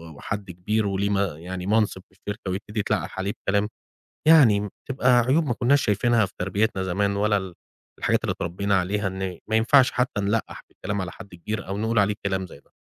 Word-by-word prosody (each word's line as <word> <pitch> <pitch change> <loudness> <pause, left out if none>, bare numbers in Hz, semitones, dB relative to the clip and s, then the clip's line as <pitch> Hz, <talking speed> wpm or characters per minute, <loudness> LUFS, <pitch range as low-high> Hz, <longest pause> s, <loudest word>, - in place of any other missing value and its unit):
وحد 100 +4 -5
كبير، 105 +5 -1
وليه 100 +1 0
م 100 - +1
يعني 90 0 -3
منصب 105 -2 +1
في - - -37
الشركة، 105 -2 -5
ويبتدي 105 +3 -4
يتلقح 100 - -2
عليه 100 +2 -1 0.2
بكلام، 100 +1 +2 0.6
يعني 110 -11 +6 0.2
تبقى 125 -2 +4
عيوب 135 +7 +2
ما 120 - 0
كنّاش 140 +4 +3
شايفينها 110 +1 +2
في 95 - -16
تربيتنا 95 +2 0
زمان، 100 +2 0
ولا 105 0 +2
ال 95 -3 -4 0.4
الحاجات - - +1
اللي - - +1
اتربينا 100 +4 -2
عليها، 100 +3 -1
إن 95 -2 -4
ما 110 - +2
ينفعش 130 +4 +5
حتى 125 -4 0
نلقّح 105 +3 -2
بالكلام 105 -1 -4
على 90 -2 -4
حد 95 -2 -12
كبير، 105 +5 -5
أو 100 - -3
نقول 110 +1 0
عليه 105 +1 +3
كلام 95 -1 -1
زي 75 - -14
ده. - - -34
100 Hz, 195 wpm, -24 LUFS, 95-110 Hz, 0.6 s, يعني